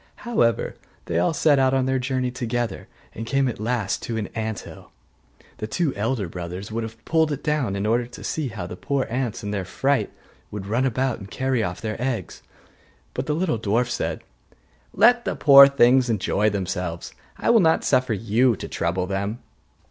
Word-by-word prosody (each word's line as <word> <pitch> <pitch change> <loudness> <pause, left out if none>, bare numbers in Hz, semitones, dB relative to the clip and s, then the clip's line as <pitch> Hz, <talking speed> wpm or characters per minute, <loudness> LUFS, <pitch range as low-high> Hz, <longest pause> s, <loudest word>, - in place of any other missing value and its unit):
However, 120 - +1 0.3
they 85 - 0
all 90 - +2
set 150 -2 +3
out 130 0 +3
on 130 -1 +2
their 130 0 +1
journey 130 0 -1
together, 120 -4 -3 0.3
and 115 - -6
came 135 +3 +1
at 120 - -4
last 110 -3 -1
to 115 - -4
an 105 - -3
ant 110 -2 -3
hill. - - -12 0.7
The 110 - -4
two 150 +5 0
elder 110 -1 -1
brothers 90 +4 -7
would 115 +1 -2
have 115 0 -8
pulled 160 -1 +2
it 145 0 -4
down, 150 -10 0
in 100 +1 -2
order 120 +2 +1
to 120 - -11
see 155 -3 -2
how 95 -6 -6
the 90 - -7
poor 140 -2 -1
ants 125 -4 -2
in 105 - -3
their 100 -2 -2
fright 135 +9 0 0.4
would 100 -2 -6
run 120 +6 +1
about 130 -1 -1
and 100 -1 -10
carry 130 0 0
off 90 -3 -3
their 110 0 -4
eggs. 120 -8 -3 0.7
But 130 - -4
the 150 - 0
little 160 -7 0
dwarf 115 +3 +1
said, 120 - -3 0.7
'Let 240 0 +5
the - - -2
poor 140 -1 +9
things 130 -2 +4
enjoy 105 0 +1
themselves, 90 -4 -4 0.2
I - - +2
will 235 - +6
not 160 -4 +3
suffer 125 -2 +2
you 115 +4 +2
to - - -7
trouble 90 -1 -1
them. 100 +3 -2
120 Hz, 195 wpm, -23 LUFS, 105-135 Hz, 0.7 s, poor